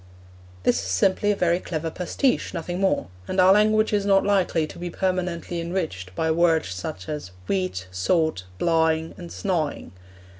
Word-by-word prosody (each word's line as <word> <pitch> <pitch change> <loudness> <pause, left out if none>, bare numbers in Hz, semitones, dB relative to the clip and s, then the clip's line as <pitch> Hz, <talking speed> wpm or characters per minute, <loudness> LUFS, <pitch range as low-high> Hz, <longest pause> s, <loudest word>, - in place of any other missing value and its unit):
This 125 - +3
is 95 - -5
simply 190 - +2
a - - +1
very 175 -2 +2
clever 165 -2 -4
pastiche, 215 - 0
nothing 175 +2 -3
more, 190 - +1 0.2
and 185 - -1
our 185 +1 +7
language 215 +1 +3
is 205 -1 +2
not 195 -1 +4
likely 190 -5 +2
to 155 - -11
be 175 0 -4
permanently 180 -2 -2
enriched 160 - -4
by 160 - 0
such 160 - +2
words 160 - +1 0.2
as 150 -11 -5 0.2
'weet,' 95 -1 -1
'saut,' 155 - 0
'blawing,' 160 - +1
and 175 -2 -9
'snawing.' 170 -7 -2
170 Hz, 160 wpm, -24 LUFS, 155-185 Hz, 0.2 s, our